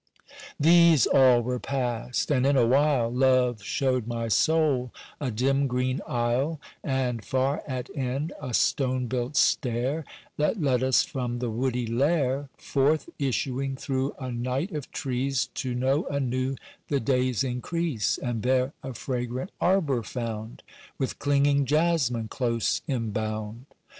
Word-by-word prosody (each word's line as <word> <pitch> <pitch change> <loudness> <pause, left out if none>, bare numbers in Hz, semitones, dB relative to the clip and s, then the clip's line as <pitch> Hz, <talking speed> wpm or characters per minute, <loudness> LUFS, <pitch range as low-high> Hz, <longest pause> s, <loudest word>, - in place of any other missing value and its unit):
These 165 -3 +6
all 130 -3 +5
were 125 +1 -2
passed, 125 -1 -2
and 130 -3 +3
in 140 0 +3
a 120 - +5
while, 130 -2 +3
Love 125 -3 +3
showed 130 +1 0
my 115 -1 -3
soul 140 -2 +2 0.3
a 140 - -2
dim 135 +5 +1
green 125 +1 -1
aisle, 125 +6 0 0.2
And 125 -5 -1
far 130 +5 0
at 130 -3 -5
end 135 +5 -2
a 125 -5 -2
stone 130 -2 +1
built 125 +3 -2
stair, 130 +4 +1 0.3
That 150 +8 +1
led 130 -6 +2
us 130 0 +4
from 125 -4 -3
the 120 -1 -2
woody 125 +1 -1
lair, 135 +3 +1
Forth 145 +3 +1
issuing 135 0 -1
through 135 0 -2
a 130 -2 -5
night 125 - -2
of 150 -5 -5
trees 130 0 -1
To 125 -2 -3
know 135 +5 +1
anew 130 -1 -1 0.3
the 140 - +1
day's 125 -1 +1
increase, 130 - -1
And 120 -4 -3
there 130 +3 +1
a 130 -2 -7
fragrant 125 - -3
arbour 165 -9 +2
found, 115 -1 -6 0.3
With 135 - -3
clinging 140 0 +2
jasmine 145 -6 +1
close 115 -1 -1
embound. 110 -1 -3
130 Hz, 140 wpm, -26 LUFS, 120-140 Hz, 0.3 s, These